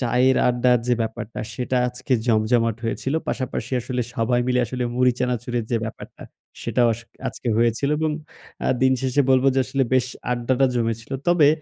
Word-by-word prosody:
চায়ের 125 +1 +3
আড্ডার 125 0 +3
যে 125 - +3
ব্যাপারটা 110 0 -5
সেটা 125 +2 -2
আজকে 125 +2 -4
জমজমাট 115 0 +2
হয়েছিল। 130 +5 -2
পাশাপাশি 130 -2 -3
আসলে 125 +1 -3
সবাই 120 +2 +1
মিলে 125 0 +2
আসলে 125 +2 -3
মুড়ি 125 0 +3
চানাচুরের 120 -2 -1
যে 120 - +2
ব্যাপারটা 110 - -9 0.4
সেটাও 120 -2 +2
আস 115 - -9 0.3
আজকে - - -5
হয়েছিল 120 +4 +2
এবং 155 0 +1 0.6
আ - - +2
দিনশেষে 130 +1 +2
বলব 130 0 +4
যে - - +2
আসলে 135 +1 0
বেশ 130 -1 +3 0.2
আড্ডাটা 125 +2 +2
জমেছিল। 115 +1 -2
তবে 175 -4 +5
125 Hz, 160 wpm, -23 LUFS, 115-130 Hz, 0.6 s, তবে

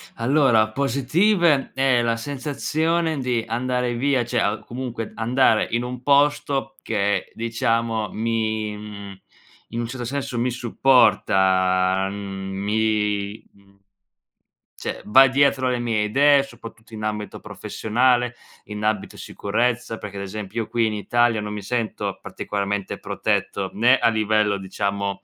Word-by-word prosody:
Allora, 120 -3 +3
positive 140 - +2
è 135 -2 +3
la 115 -1 0
sensazione 155 +4 -1
di 125 -3 -1
andare 125 +1 -1
via 130 -1 +1
cioè 120 -1 -1
a 105 0 0
comunque 120 -2 -6
andare 115 0 +2
in 120 +1 0
un 125 0 -6
posto 140 -1 +2
che, 100 -3 -1
diciamo, 115 -1 -1
mi 110 -1 -1
mhmm, 100 -2 -9 0.5
in 115 - -3
un 120 - -2
certo 120 0 -6
senso 130 -2 -3
mi 125 +1 +1
supporta, 95 -6 +3
mhmm, 95 -1 -6
mi 105 0 -1
mhmm, 100 0 -25 1.0
cioè - - -5
va 135 +6 +7
dietro 135 -1 +2
alle 125 -1 0
mie 115 -3 0
idee, 140 +5 +4
soprattutto 115 -3 -13
in 110 0 -6
ambito 105 -1 -4
professionale, 125 +2 0 0.3
in 105 0 -6
ambito 110 -2 -1
sicurezza, 115 +2 -2
perché, 100 -1 -8
ad 100 - -4
esempio, 105 +2 -5
io - - -13
qui 115 -1 +1
in 110 - -1
Italia 115 +2 +1
non 105 0 -5
mi 105 - -5
sento 115 -1 -3
particolarmente 100 -1 -3
protetto, 95 -1 -2
né 125 +5 +4
a 115 - +3
livello 110 -2 +1
diciamo, 100 +1 -3
115 Hz, 135 wpm, -23 LUFS, 105-125 Hz, 1.0 s, va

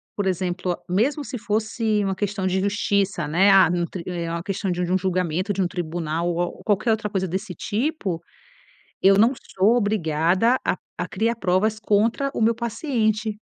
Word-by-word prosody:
por 200 -2 -1
exemplo, 180 -1 -1
mesmo 260 - +1
se 260 -2 -5
fosse 220 -1 0
uma 195 -1 -1
questão 200 -1 -2
de 185 +1 +1
justiça, 200 -4 0
né. 185 +6 +4
Ah, 195 -3 +7
no 175 0 0
tri 175 -3 -7
é 170 -2 -3
uma 170 0 -3
questão 195 0 -3
de 175 +1 -2
um 180 +1 0
um - - +4
julgamento, 185 +1 -1
de 195 - -1
um 180 - +2
tribunal 170 -1 -3
ou 175 0 0
a - - +2
ou - - -9
qualquer 215 +2 +2
outra 220 -1 -1
coisa 190 -1 -1
desse 190 +2 -4
tipo, 210 - -2 0.8
eu 195 0 +6
não 225 +5 +5
sou 210 +1 +1
obrigada 190 +2 +2
a-a - - -3
criar 230 +2 0
provas 210 +2 +1
contra 225 +6 +1
o - - -1
meu 230 +1 +4
paciente. 220 -3 -1
195 Hz, 185 wpm, -23 LUFS, 180-220 Hz, 0.8 s, Ah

